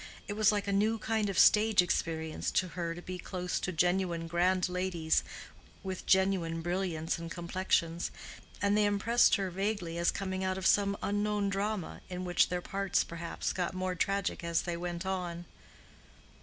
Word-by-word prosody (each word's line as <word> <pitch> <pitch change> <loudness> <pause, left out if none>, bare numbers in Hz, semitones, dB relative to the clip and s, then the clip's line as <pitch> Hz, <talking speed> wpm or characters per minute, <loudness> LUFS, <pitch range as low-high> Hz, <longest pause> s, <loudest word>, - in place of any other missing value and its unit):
It 205 - -3
was 215 0 +4
like 205 -1 -1
a 200 - 0
new 215 +3 +2
kind 220 -1 -1
of 195 - -3
stage 215 -1 +5
experience 160 -3 0
to 185 - +1
her 170 -1 -3
to 175 - -9
be 180 0 -6
close 180 0 -3
to 185 - -2
genuine 175 0 +1
grand 180 +2 +2
ladies 180 -3 0 0.6
with 190 -1 -5
genuine 190 -4 +2
brilliants 175 -2 -1
and 165 0 -6
complexions, 170 -1 -1 0.5
and 200 0 +3
they 210 0 +4
impressed 205 +4 +4
her 195 -3 -2
vaguely 185 -3 -2
as 170 - +3
coming 190 -1 -2
out 185 0 -1
of 190 - -5
some 200 0 +3
unknown 205 0 0
drama, 200 -1 -2
in 180 0 -4
which 175 -1 +3
their 180 0 -2
parts 195 -1 0
perhaps 170 0 -4
got 180 0 -2
more 185 0 -1
tragic 195 +1 -1
as 170 -1 0
they 175 -1 -3
went 175 +1 -4
on. 175 -2 -3
185 Hz, 170 wpm, -31 LUFS, 170-200 Hz, 0.6 s, stage